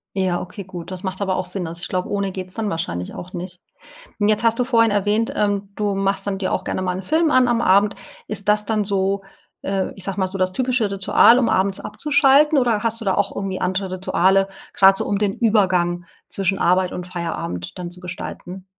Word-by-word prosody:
Ja, 185 -2 0
okay, 185 +2 -8
gut, 175 -2 -9
das 185 0 -7
macht 190 0 -4
aber 190 -2 0
auch 185 - -2
Sinn. 180 -1 -3
Also, 170 +1 -7
ich - - -4
glaub 180 -1 -2
ohne 200 -1 -2
geht's 185 -1 -7
dann 220 -2 -2
wahrscheinlich 90 - -4
auch 180 - -8
nicht. 180 0 -7 0.6
Und 205 - +2
jetzt 215 +1 +2
hast 230 0 +3
du - - +3
vorhin 230 -3 +3
erwähnt, 205 +2 +1
ähm, 205 -1 0
du 205 -1 -1
machst 195 0 0
dann 195 -1 -2
dir 190 - -2
auch - - -1
gerne - - -3
mal 185 -1 -1
'n 190 - -6
Film 320 - +2
an 255 -2 +4
am 235 -1 +1
Abend. 200 +2 +3 0.3
Ist 205 -1 -3
das 210 0 +3
dann 215 -1 0
so, 195 0 0 0.4
äh, 195 -1 -2
ich 195 - -6
sag 195 +1 -4
mal 190 -1 +1
so 190 +1 -4
das 185 0 +1
typische 245 0 0
Ritual, 195 +4 +5
um 245 - +2
abends 190 +1 +1
abzuschalten, 285 +6 +3
oder 235 -5 +2
hast 230 0 0
du - - -6
da 190 - +2
auch - - -1
irgendwie 195 -1 -4
andere 190 0 -1
Rituale, 190 +1 +2 0.3
grad 195 0 +6
so - - -1
um 200 - -1
den 205 -2 +1
Übergang 185 -6 +2 0.2
zwischen 195 0 -1
Arbeit 180 +1 +2
und 180 - -5
Feierabend 165 - -5
dann 175 -1 -6
zu 180 - -12
gestalten? 180 +1 -8
195 Hz, 225 wpm, -21 LUFS, 185-210 Hz, 0.6 s, grad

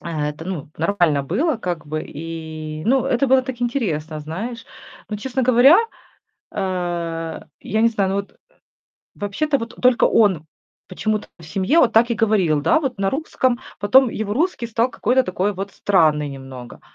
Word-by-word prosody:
это, 150 -1 -4
ну, 170 -6 -5
нормально 165 -5 +1
было 255 - 0
как 175 -7 -4
бы. 155 +1 -3
И, 155 -1 -7
ну 260 +2 +3
это 255 +3 +1
было 260 0 +4
так 255 -1 -6
интересно, 170 - -2
знаешь. 215 +10 -6 0.4
Но, 210 - -3
честно 260 +4 -2
говоря, 255 +6 +7 0.7
а, 175 -4 -3 0.2
я 220 +1 -1
не 230 - +5
знаю, 200 -4 0
ну 195 - -1
вот, 200 0 -4
э - - -30 0.8
Вообще-то, 280 +9 0
вот 230 -2 -7
только 250 -1 +4
он 190 -8 +3 0.4
почему-то 215 +3 -2
в - - -14
семье, 195 - +1
вот 245 -7 +4
так 235 +2 +4
и - - +3
говорил, 205 -9 +2
да 170 - +3
вот, 260 -9 -3
на 195 - +1
русском. 260 -3 -1 0.2
Потом, 250 +5 +5
его 210 -2 -3
русский 295 -4 -1
стал, 230 +2 +1
какой-то 255 +4 +2
такой, 185 +1 -1
вот, 195 +1 -5
странный 155 -8 +2
немного. 135 -3 -10
200 Hz, 165 wpm, -21 LUFS, 165-240 Hz, 0.8 s, говоря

